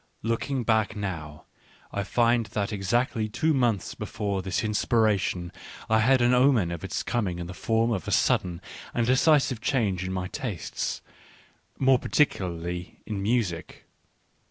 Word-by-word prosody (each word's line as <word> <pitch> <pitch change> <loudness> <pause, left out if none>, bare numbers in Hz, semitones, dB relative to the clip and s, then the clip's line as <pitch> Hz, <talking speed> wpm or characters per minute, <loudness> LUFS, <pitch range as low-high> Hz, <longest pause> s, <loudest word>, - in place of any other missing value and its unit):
Looking 120 +3 -1
back 110 -1 +1
now, 85 -7 -5 0.5
I 100 - -2
find 115 +2 +2
that 105 +1 -2
exactly 110 +2 0
two 155 +9 +1
months 120 - +1
before 100 -3 -3
this 95 0 -1
inspira 110 -1 +2
tion 85 -1 -3 0.4
I 110 - +5
had 130 +3 +4
an 120 +1 +4
omen 125 -8 +4
of 85 -2 -5
its - - -3
coming 105 -8 -1
in 85 - -5
the 90 - -7
form 115 +5 +1
of 95 -7 -2
a - - -2
sudden 85 -2 +1 0.3
and 120 - +2
decisive 130 -1 +3
change 110 -8 0
in 95 - -3
my 90 -1 -2
tastes 115 - -4 0.4
— - - -29 0.3
more 130 -1 +4
particularly 90 - -1
in 105 -3 -4
music. 100 -5 -2
110 Hz, 155 wpm, -26 LUFS, 95-120 Hz, 0.5 s, I